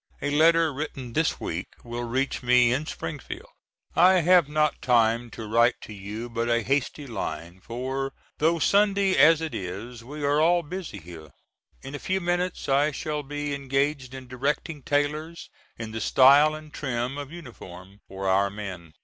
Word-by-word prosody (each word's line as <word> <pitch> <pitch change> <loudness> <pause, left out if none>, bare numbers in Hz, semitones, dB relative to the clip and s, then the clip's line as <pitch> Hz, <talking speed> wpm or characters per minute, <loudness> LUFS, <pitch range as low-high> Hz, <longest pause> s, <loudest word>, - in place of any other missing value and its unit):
A 145 - -2
letter 160 +1 +4
written 135 -4 -6
this 160 +3 +1
week - - -4 0.2
will 120 0 -5
reach 130 +4 -1
me 125 -1 +4
in 145 +4 -2
Springfield. 365 - -7 0.4
I 185 +1 +6
have 175 -3 +5
not 150 0 +1
time 115 -1 +2
to 110 - -8
write 115 +3 +3
to 110 - -9
you 105 +4 -6
but 115 0 -2
a 115 -1 +2
hasty 140 +3 -1
line, 85 - -5
for, 130 +4 -4 0.3
though 165 +3 +3
Sunday 200 +2 +3
as 160 0 +6
it 160 -5 -4
is, 110 +5 -6
we 145 +4 -8
are 145 +1 +2
all 170 +2 +3
busy 175 - -6
here. 80 -3 -11 0.5
In 135 +1 -8
a 145 - -5
few 190 +1 -1
minutes 175 0 -2
I 140 +2 +3
shall 150 +1 -3
be 145 +1 -4
engaged 135 -1 -1
in 130 -1 -9
directing 140 +4 -2
tailors 150 +3 -2 0.3
in 115 -1 -6
the 110 0 -5
style 140 +6 +6
and 155 -1 -11
trim 130 0 -3
of 145 0 -7
uniform 100 - -11
for 95 0 -5
our 100 +1 +3
men. 95 -5 -8
135 Hz, 170 wpm, -26 LUFS, 115-155 Hz, 0.5 s, I